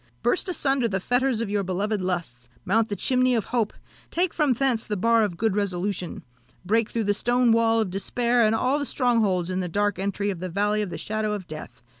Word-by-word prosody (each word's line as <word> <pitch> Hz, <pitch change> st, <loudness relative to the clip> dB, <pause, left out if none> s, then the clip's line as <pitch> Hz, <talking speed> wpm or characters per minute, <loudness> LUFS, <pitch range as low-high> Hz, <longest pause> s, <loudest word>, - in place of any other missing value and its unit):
Burst 365 Hz, +9 st, +1 dB
asunder 270 Hz, -8 st, +1 dB
the 195 Hz, -3 st, -1 dB
fetters 245 Hz, +3 st, +1 dB
of 230 Hz, -, -2 dB
your 205 Hz, -1 st, +1 dB
beloved 200 Hz, +2 st, -1 dB
lusts, 165 Hz, -10 st, -4 dB, 0.2 s
mount 225 Hz, +3 st, +2 dB
the 205 Hz, -, -2 dB
chimney 255 Hz, +4 st, +2 dB
of 225 Hz, -, 0 dB
hope, 230 Hz, -4 st, 0 dB, 0.4 s
take 350 Hz, 0 st, 0 dB
from 295 Hz, -5 st, +2 dB
thence 245 Hz, -2 st, +1 dB
the 210 Hz, -3 st, -3 dB
bar 230 Hz, +3 st, +3 dB
of 190 Hz, -5 st, -2 dB
good 220 Hz, -1 st, 0 dB
resolution, 190 Hz, -2 st, -2 dB, 0.4 s
break 225 Hz, +3 st, +2 dB
through 230 Hz, -, -1 dB
the 205 Hz, 0 st, +2 dB
stone 240 Hz, +3 st, +2 dB
wall 225 Hz, 0 st, +3 dB
of 215 Hz, -5 st, -1 dB
despair, 235 Hz, +5 st, +1 dB
and 220 Hz, 0 st, +3 dB
all 255 Hz, +5 st, +1 dB
the 285 Hz, -, -2 dB
strongholds 210 Hz, -9 st, +1 dB
in 185 Hz, -, -1 dB
the 180 Hz, -1 st, -2 dB
dark 205 Hz, +2 st, 0 dB
entry 200 Hz, +1 st, -1 dB
of 185 Hz, -, -6 dB
the 185 Hz, +1 st, -4 dB
valley 205 Hz, +4 st, +1 dB
of 205 Hz, -, -3 dB
the 170 Hz, -, -5 dB
shadow 215 Hz, +4 st, -2 dB
of 200 Hz, -3 st, -5 dB
death! 155 Hz, -6 st, -9 dB
215 Hz, 220 wpm, -25 LUFS, 190-240 Hz, 0.4 s, bar